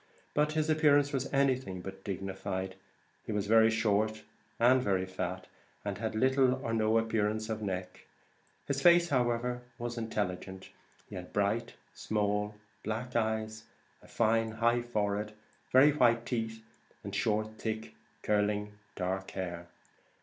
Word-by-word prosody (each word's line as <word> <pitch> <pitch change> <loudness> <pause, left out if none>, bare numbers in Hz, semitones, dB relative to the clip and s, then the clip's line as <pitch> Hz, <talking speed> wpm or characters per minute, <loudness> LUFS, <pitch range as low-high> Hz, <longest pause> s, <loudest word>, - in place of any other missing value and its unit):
But 150 +1 +2
his 155 -1 +1
appearance 145 -2 +4
was 135 -1 -2
anything 130 -9 +1
but 95 +1 -8
dignified; 95 -1 -4 0.5
he - - -2
was 105 -1 0
very 110 +1 +6
short, 110 -1 +1 0.4
and 125 +2 +5
very 95 -5 +1
fat, 95 0 -4 0.4
and 100 -1 -3
had 110 -1 -2
little 130 +2 +3
or 115 - -1
no 110 0 +3
appearance 110 -1 0
of 110 -1 -3
neck; 95 -3 -5 0.6
his 140 -1 -1
face, 175 +1 +6
however 125 -1 0 0.2
was 120 0 -4
intelligent; 95 -4 -4 0.4
he - - -13
had 90 -1 -7
bright, 105 +3 0 0.2
small 105 0 -1 0.3
black 115 +4 -4
eyes, 110 -1 -1 0.4
a - - -17
fine, 115 0 +1
high 120 +2 +2
forehead, 105 -2 -1 0.4
very 135 +3 +7
white 120 -4 +3
teeth, 110 -2 -3 0.4
and - - -6
short 110 0 0
thick, 110 0 -4 0.3
curling, 105 0 0 0.2
dark 95 +1 -2
hair. 85 -2 -5
110 Hz, 135 wpm, -31 LUFS, 100-120 Hz, 0.6 s, very